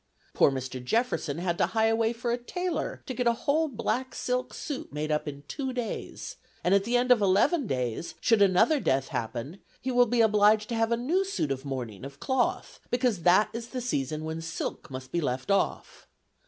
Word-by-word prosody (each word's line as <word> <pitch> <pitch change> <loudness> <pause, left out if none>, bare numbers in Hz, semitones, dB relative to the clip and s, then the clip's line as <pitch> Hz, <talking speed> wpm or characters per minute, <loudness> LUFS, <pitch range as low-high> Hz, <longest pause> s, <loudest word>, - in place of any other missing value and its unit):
Poor - - +5
Mr. 130 -1 -5
Jefferson 170 - 0
had 175 0 -2
to - - +3
hie 220 - +5
away 225 0 +2
for 240 0 -3
a 240 - +1
tailor 355 +8 -3
to 260 - -4
get 245 0 0
a 235 - +5
whole 315 +3 +3
black 260 0 -2
silk 250 0 -1
suit 285 -3 -6
made 150 +1 -3
up 150 0 0
in 140 -1 -6
two 265 -2 -3
days; 245 -3 -5 0.3
and 180 - +3
at 200 0 +3
the 240 +2 +2
end 250 +1 +2
of 240 -4 +6
eleven 210 - +3
days, 125 +2 -2
should 225 -3 +3
another 200 - +4
death 135 - +1
happen, 120 - -4 0.2
he 260 - -3
will 245 0 +5
be 240 +1 +2
obliged 210 0 +4
to 235 - -1
have 225 0 +1
a 235 - +3
new 320 +11 +1
suit 385 - -2
of 135 +1 -3
mourning, 125 -7 -5
of 140 +1 -9
cloth, 260 -2 -1
because 245 -6 +1
that 185 +5 +5
is 230 0 -5
the 255 - -5
season 155 - -2
when 160 +1 -4
silk 165 - -5
must 130 -1 -8
be 170 - 0
left 130 +4 -2
off. 195 - -1
215 Hz, 210 wpm, -28 LUFS, 150-245 Hz, 0.3 s, of